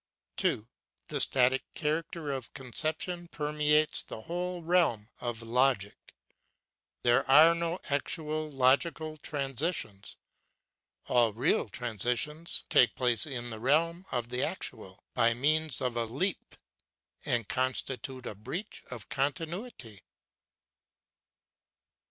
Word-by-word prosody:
2. 110 Hz, -, +1 dB, 0.4 s
The -, -, 0 dB
static 130 Hz, 0 st, +4 dB
character 155 Hz, 0 st, -2 dB
of 130 Hz, -4 st, -5 dB
conception 155 Hz, +6 st, -1 dB
permeates 150 Hz, -1 st, +2 dB
the 110 Hz, -, -8 dB
whole 175 Hz, +5 st, -4 dB
realm 160 Hz, -11 st, +2 dB
of 120 Hz, -1 st, -4 dB
logic; 115 Hz, -3 st, 0 dB, 0.9 s
there 120 Hz, 0 st, +4 dB
are 155 Hz, +5 st, +8 dB
no 170 Hz, +1 st, -2 dB
actual 155 Hz, +2 st, -2 dB
logical 150 Hz, +4 st, +1 dB
transitions. 140 Hz, -, -2 dB, 0.9 s
All 120 Hz, -3 st, +3 dB
real 120 Hz, 0 st, +1 dB
transitions 125 Hz, -, -1 dB
take 120 Hz, -3 st, +5 dB
place 125 Hz, +3 st, +3 dB
in 120 Hz, -4 st, -4 dB
the 110 Hz, -, -6 dB
realm 165 Hz, -, +1 dB
of 120 Hz, -2 st, -2 dB
the 125 Hz, +1 st, -1 dB
actual, -, -, -4 dB
by 115 Hz, 0 st, +3 dB
means 155 Hz, +2 st, +1 dB
of 125 Hz, -2 st, -1 dB
a 120 Hz, -1 st, 0 dB
leap, 170 Hz, -, -2 dB, 0.7 s
and 115 Hz, -4 st, 0 dB
constitute 130 Hz, 0 st, -2 dB
a -, -, -4 dB
breach 130 Hz, -, -6 dB
of 120 Hz, -5 st, -8 dB
continuity. 145 Hz, -, -4 dB
135 Hz, 110 wpm, -30 LUFS, 120-160 Hz, 0.9 s, are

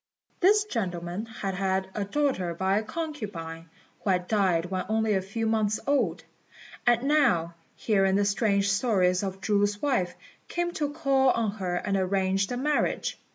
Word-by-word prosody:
This 410 Hz, +3 st, +5 dB
gentleman 185 Hz, -, -3 dB
had 200 Hz, -3 st, -4 dB
had 190 Hz, 0 st, -1 dB
a 210 Hz, -, -2 dB
daughter 200 Hz, -8 st, 0 dB
by 190 Hz, +3 st, +1 dB
a -, -, -5 dB
concubine, 205 Hz, -, -6 dB, 0.3 s
who 205 Hz, -, -3 dB
had 180 Hz, -1 st, +1 dB
died 185 Hz, -6 st, +2 dB
when 185 Hz, -1 st, -1 dB
only 220 Hz, 0 st, +1 dB
a 190 Hz, -, +1 dB
few 200 Hz, +4 st, -3 dB
months 215 Hz, -1 st, +1 dB
old; 280 Hz, 0 st, +1 dB, 0.6 s
and 240 Hz, 0 st, +4 dB
now, 270 Hz, -, +2 dB, 0.2 s
hearing 195 Hz, -3 st, +2 dB
the 200 Hz, 0 st, +2 dB
strange 200 Hz, -1 st, +2 dB
story 195 Hz, -3 st, +2 dB
of 195 Hz, -1 st, -4 dB
Chu's 205 Hz, 0 st, +1 dB
wife, 225 Hz, -11 st, 0 dB, 0.3 s
came 345 Hz, 0 st, -1 dB
to 295 Hz, -3 st, -2 dB
call 275 Hz, -3 st, +2 dB
on 230 Hz, -4 st, +1 dB
her 185 Hz, -4 st, -3 dB
and 195 Hz, +2 st, -1 dB
arrange 190 Hz, 0 st, +1 dB
the 245 Hz, -, -3 dB
marriage. 295 Hz, +3 st, 0 dB
200 Hz, 160 wpm, -27 LUFS, 190-240 Hz, 0.6 s, This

